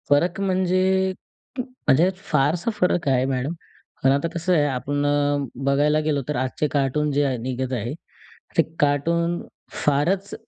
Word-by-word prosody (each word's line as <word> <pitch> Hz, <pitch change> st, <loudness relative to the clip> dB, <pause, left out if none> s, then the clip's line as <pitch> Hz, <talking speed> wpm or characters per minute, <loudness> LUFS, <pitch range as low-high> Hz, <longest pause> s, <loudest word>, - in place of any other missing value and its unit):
फरक 165 Hz, +6 st, +2 dB
म्हणजे 185 Hz, -1 st, +1 dB, 0.8 s
म्हणजे 215 Hz, -, +2 dB
फारसा 165 Hz, +2 st, 0 dB
फरक 180 Hz, -3 st, +1 dB
आहे 130 Hz, -1 st, +2 dB
मॅडम. 135 Hz, +3 st, -1 dB, 0.5 s
पण 135 Hz, -, +5 dB
आता 140 Hz, +4 st, +1 dB
कसं 170 Hz, +2 st, 0 dB
आहे 150 Hz, -4 st, +3 dB
आपण 145 Hz, +1 st, -1 dB, 0.6 s
बघायला 145 Hz, +2 st, +3 dB
गेलो 145 Hz, -2 st, +1 dB
तर 150 Hz, -, -2 dB
आजचे 130 Hz, +4 st, -1 dB
कार्टून 145 Hz, +1 st, +1 dB
जे 145 Hz, +1 st, +2 dB
आहे, 130 Hz, -2 st, 0 dB
निघत 130 Hz, +2 st, -3 dB
आहे 120 Hz, +1 st, -2 dB, 0.6 s
ते -, -, +8 dB, 0.2 s
कार्टून 170 Hz, +4 st, +1 dB, 0.4 s
फारच 170 Hz, +8 st, +1 dB
145 Hz, 135 wpm, -23 LUFS, 135-170 Hz, 0.8 s, ते